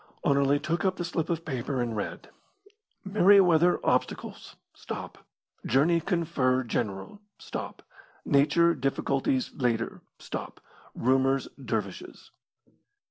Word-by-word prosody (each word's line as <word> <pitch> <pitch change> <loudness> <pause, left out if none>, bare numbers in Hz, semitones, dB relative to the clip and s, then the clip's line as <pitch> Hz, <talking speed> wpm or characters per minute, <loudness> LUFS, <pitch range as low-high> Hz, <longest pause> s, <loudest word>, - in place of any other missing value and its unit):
Anerley 140 0 +3
took 165 +4 -2
up 190 -1 +1
the 175 - -4
slip 165 -2 -2
of 165 -1 -2
paper 130 -1 -3
and 120 -2 -2
read: 105 - -5 0.7
Merryweather 185 -4 +5
obstacles - - -2 0.2
stop - - -7 0.4
journey 155 +7 +3
confer 155 -8 0
general 110 - -4 0.2
stop - - -7 0.4
nature 150 +4 +4
difficulties 135 -2 -1
later 115 -3 -1 0.2
stop - - -7 0.4
rumours 135 +2 +2
dervishes. 105 -6 -5
140 Hz, 100 wpm, -28 LUFS, 125-170 Hz, 0.7 s, Merryweather